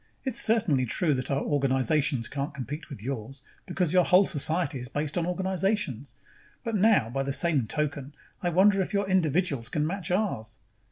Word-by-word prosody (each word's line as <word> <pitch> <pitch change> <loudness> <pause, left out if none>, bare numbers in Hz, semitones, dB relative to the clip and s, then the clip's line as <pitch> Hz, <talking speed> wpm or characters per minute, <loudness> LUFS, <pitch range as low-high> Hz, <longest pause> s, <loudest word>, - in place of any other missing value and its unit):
It's 255 -3 +1
certainly 200 - +2
true 155 +6 +1
that 130 -1 -2
our 140 0 0
organizations 135 -2 +1
can't 140 +1 -4
compete 145 +3 -6
with 125 -7 -9
yours, 135 +1 -5 0.2
because 180 -2 0
your 180 -1 +5
whole 180 +3 +5
society 160 -3 0
is 125 - -6
based 145 +3 -3
on 175 -1 0
organizations. 180 - -2 0.5
But 230 -2 -2
now, 200 - +3
by 135 +2 -1
the 135 0 -2
same 145 -5 +1
token, 145 0 -3 0.3
I 175 - 0
wonder 195 +3 +4
if 190 - -4
your 200 0 +1
individuals 165 -8 +1
can 150 -1 0
match 185 +2 -4
ours. 140 - -1
150 Hz, 175 wpm, -27 LUFS, 135-185 Hz, 0.5 s, your